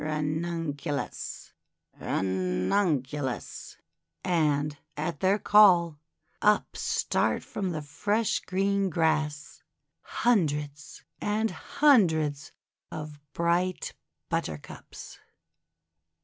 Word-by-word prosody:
Ranunculus! 155 -1 -3 0.5
Ranunculus! 125 - -1 0.2
' 85 +1 -52
And 150 -4 +1 0.2
at 155 +3 -3
their 190 +2 +3
call, 180 -8 +5 0.4
up 210 0 +2
start - - 0
from 195 -3 -3
the 155 -3 -4
fresh 205 +9 0
green 195 +1 0
grass 155 -3 -1 0.4
hundreds 150 -10 -1 0.2
and 215 +2 0
hundreds 160 - +2 0.4
of 150 -1 -7
bright 175 +2 0 0.3
Buttercups. 75 -2 -6
160 Hz, 75 wpm, -28 LUFS, 145-190 Hz, 0.5 s, call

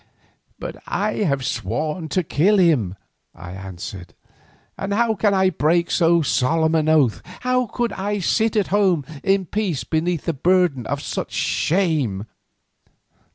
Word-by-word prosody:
"But - - -7
I 210 +1 -1
have 140 -10 0
sworn 150 - -3
to 185 +5 0
kill 185 +7 +2
him," 145 - +2 0.4
I 90 - -9
answered, 95 -1 -8 0.6
"and 200 +1 -3
how 230 0 +2
can 205 -1 +1
I 190 0 +3
break 170 +2 +1
so 170 -1 +3
solemn 160 +4 +1
an 155 -1 +2
oath? 145 -8 +3 0.2
How 250 0 +1
could 235 0 -2
I 205 +2 -2
sit 220 +3 +1
at 210 -3 +1
home 190 -7 +2 0.2
in 195 -1 +2
peace 190 -6 -2
beneath 165 0 -1
the 165 - 0
burden 170 -5 +1
of 140 +1 -3
such - - -4
shame?" 150 - 0
170 Hz, 145 wpm, -21 LUFS, 140-200 Hz, 0.6 s, I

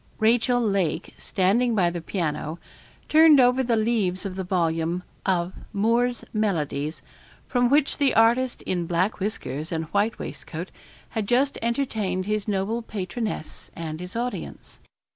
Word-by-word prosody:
Rachel 240 +2 +3
Lake, 195 -7 0
standing 220 +6 +1
by 175 -4 +3
the 170 -1 -4
piano, 160 -3 -3 0.5
turned 310 -2 +7
over 250 +1 +5
the 240 -2 +1
leaves 215 -5 0
of 190 -2 -4
the 190 - -3
volume 170 -1 0 0.2
of 180 -1 +1 0.2
'Moore's 235 +4 +1
Melodies' 160 -8 -1 0.4
from 245 -1 +2
which 285 +2 +2
the 280 -2 +3
artist 240 +3 +3
in 175 -2 -2
black 180 +6 0
whiskers 160 - -4
and 160 -1 -2
white 205 +2 +1
waistcoat 170 +3 -7 0.4
had 220 -3 -3
just 270 +5 +2
entertained 220 -7 -1
his 210 0 -1
noble 205 +3 -1
patroness 215 -3 -5
and 160 -1 -5
his 180 +2 -8
audience. 240 +1 -5
205 Hz, 140 wpm, -25 LUFS, 175-235 Hz, 0.5 s, turned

